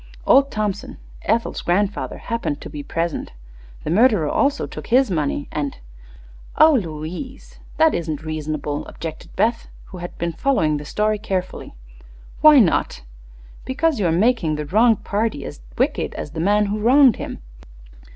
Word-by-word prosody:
Old 275 0 +5
Thompson, 210 -4 -3 0.3
Ethel's 230 +2 0
grandfather, 200 +3 -1
happened 230 -11 -3
to - - -9
be 150 -1 -6
present. 165 - -3 0.5
The - - -3
murderer 210 -5 +4
also 280 +1 +1
took - - -9
his 255 -2 +3
money, 145 -3 -1
and 145 -2 -3 0.4
" - - -21
"Oh, 315 0 +7
Louise! 180 - -5 0.2
That 320 -1 +4
isn't 155 -3 -3
reasonable," 155 -2 -3
objected 160 -2 -8
Beth, 230 +1 0 0.2
who 185 - -9
had 175 0 -8
been 170 0 -2
following 160 - +1
the 145 - -8
story 210 +7 0
carefully. 185 - -4 0.7
"Why 305 -1 +8
not?" 190 - +2 0.6
"Because 280 +1 0
you 190 - +2
are - - +2
making 180 -3 +2
the 150 0 -4
wronged 220 +7 +3
party 205 -8 -2
as - - -9 0.2
wicked - - 0
as 145 - -6
the 160 - -6
man 205 +5 +3
who 205 +1 -2
wronged 255 +2 +5
him. - - -6
195 Hz, 155 wpm, -21 LUFS, 155-230 Hz, 0.7 s, Why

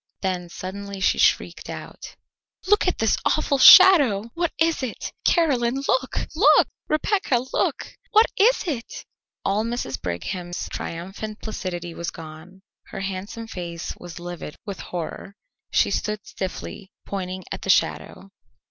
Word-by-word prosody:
Then 180 -2 -2
suddenly 195 +3 -7
she 190 - +2
shrieked - - +1
out: - - -9 0.5
"Look 415 0 +3
at 365 - +1
this 225 -2 +2
awful 290 -3 +1
shadow! 260 - +8
What 340 -1 -1
is 325 -1 +2
it? 255 -4 -5
Caroline, 265 -7 +2
look, 260 0 0
look! 385 +10 +6 0.2
Rebecca, 305 - +1
look! - - -1 0.2
What 435 0 +6
is 465 +5 +4
it?" 270 -9 -5 0.4
All 200 +2 +1
Mrs. 230 - -3
Brigham's 175 - -4
triumphant 195 +6 -6
placidity 175 -5 -5
was 170 +1 -4
gone. 165 +4 -12 0.2
Her - - -7
handsome 195 +4 -5
face 170 -6 -6
was 175 -1 -10
livid 175 -3 -7
with 200 -3 -6
horror. 180 +3 -6 0.3
She - - +2
stood 210 -1 -2
stiffly 190 +1 -6
pointing 185 -1 -5
at - - -5
the - - -6
shadow. 195 - 0
200 Hz, 135 wpm, -23 LUFS, 180-260 Hz, 0.5 s, shadow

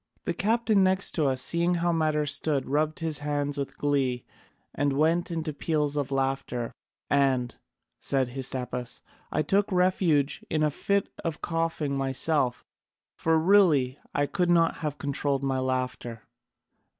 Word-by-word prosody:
The - - 0
captain 220 -2 +2
next 190 +1 +3
to 155 -4 +1
us 130 -1 0
seeing 170 +1 +1
how 175 0 +1
matters 155 -2 +1
stood 145 -2 0
rubbed 155 +3 0
his 160 -3 -2
hands 145 -1 -1
with 140 -1 -4
glee 135 -4 0 0.5
and 145 0 0
went 165 +5 +2
into 160 -2 -3
peals 150 -1 -1
of 145 -2 -1
laughter. 135 -3 -1 0.4
And," 135 -3 +1 0.4
said 135 -3 0
Hystaspas, 125 -1 -4 0.3
"I 155 - +1
took 200 +7 +1
refuge 180 -6 +2
in 155 -1 +1
a 150 - +2
fit 200 +6 0 0.2
of 165 -2 -4
coughing 165 -4 -1
myself, 135 -1 0 0.5
for 165 0 +2
really 160 -7 +4
I 145 - +1
could 180 +2 0
not 165 -1 +3
have 150 -2 -3
controlled 140 -1 -1
my 135 -1 0
laughter. 130 -3 -3
145 Hz, 145 wpm, -27 LUFS, 135-165 Hz, 0.5 s, really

